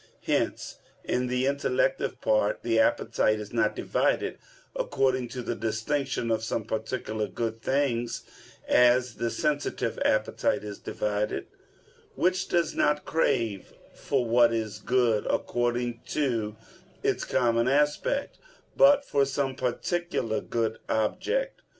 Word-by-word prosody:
Hence, -, -, -1 dB, 0.2 s
in 125 Hz, 0 st, 0 dB
the 125 Hz, +1 st, 0 dB
intellective 385 Hz, -, 0 dB
part, -, -, +1 dB
the 345 Hz, -, +2 dB
appetite 280 Hz, -, +2 dB
is 105 Hz, +1 st, -8 dB
not 110 Hz, -2 st, +1 dB
divided -, -, 0 dB, 0.4 s
according 130 Hz, -2 st, 0 dB
to 125 Hz, +1 st, -6 dB
the 120 Hz, -, -2 dB
distinction 115 Hz, +3 st, -1 dB
of 110 Hz, 0 st, 0 dB
some 110 Hz, 0 st, -2 dB
particular 110 Hz, -1 st, -3 dB
good 115 Hz, -1 st, -4 dB
things, 125 Hz, -3 st, 0 dB, 0.4 s
as 125 Hz, 0 st, +4 dB
the 120 Hz, -, -1 dB
sensitive 145 Hz, -5 st, -1 dB
appetite 110 Hz, -1 st, +1 dB
is 105 Hz, -1 st, -7 dB
divided, 105 Hz, 0 st, -2 dB, 0.7 s
which 185 Hz, +1 st, +1 dB
does 170 Hz, -2 st, +1 dB
not 150 Hz, 0 st, +1 dB
crave 115 Hz, -, 0 dB, 0.2 s
for 135 Hz, -3 st, -1 dB
what 120 Hz, 0 st, +5 dB
is 110 Hz, -2 st, -3 dB
good 120 Hz, -3 st, +1 dB
according 120 Hz, 0 st, -1 dB
to 115 Hz, -7 st, -1 dB, 0.5 s
its -, -, +1 dB
common 115 Hz, 0 st, +2 dB
aspect, 150 Hz, -, +1 dB, 0.4 s
but 280 Hz, 0 st, +6 dB
for 140 Hz, -, +2 dB
some 135 Hz, 0 st, -1 dB
particular 130 Hz, -1 st, -1 dB
good 115 Hz, -1 st, -2 dB
object. -, -, -1 dB
125 Hz, 120 wpm, -27 LUFS, 115-145 Hz, 0.7 s, but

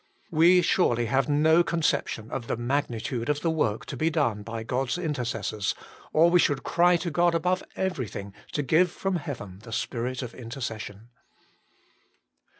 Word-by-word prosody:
We 175 Hz, +3 st, +5 dB
surely 120 Hz, -10 st, +2 dB
have 135 Hz, +5 st, +1 dB
no 160 Hz, +3 st, +4 dB
conception 155 Hz, -9 st, -1 dB
of 120 Hz, -3 st, -4 dB
the -, -, -1 dB
magnitude 120 Hz, -1 st, -2 dB
of 150 Hz, 0 st, 0 dB
the 165 Hz, -, +1 dB
work 115 Hz, -9 st, 0 dB
to -, -, -6 dB
be 160 Hz, -, +1 dB
done 140 Hz, -10 st, 0 dB
by 115 Hz, +1 st, -5 dB
God 125 Hz, +3 st, -1 dB
s 125 Hz, -, -1 dB
intercessors, 120 Hz, -, -2 dB, 0.4 s
or 165 Hz, +2 st, +5 dB
we 180 Hz, -, +5 dB
should 145 Hz, -4 st, +2 dB
cry 175 Hz, 0 st, +4 dB
to 170 Hz, 0 st, -4 dB
God 175 Hz, +1 st, +3 dB
above 180 Hz, +3 st, +1 dB
everything 125 Hz, -, -3 dB, 0.2 s
to 145 Hz, -, 0 dB
give 165 Hz, +7 st, +4 dB
from 195 Hz, +2 st, -2 dB
heaven 110 Hz, -, -7 dB
the 115 Hz, +2 st, -12 dB
spirit 125 Hz, +3 st, -2 dB
of 120 Hz, -2 st, -7 dB
intercession. 115 Hz, -3 st, -7 dB
135 Hz, 160 wpm, -27 LUFS, 115-165 Hz, 0.4 s, We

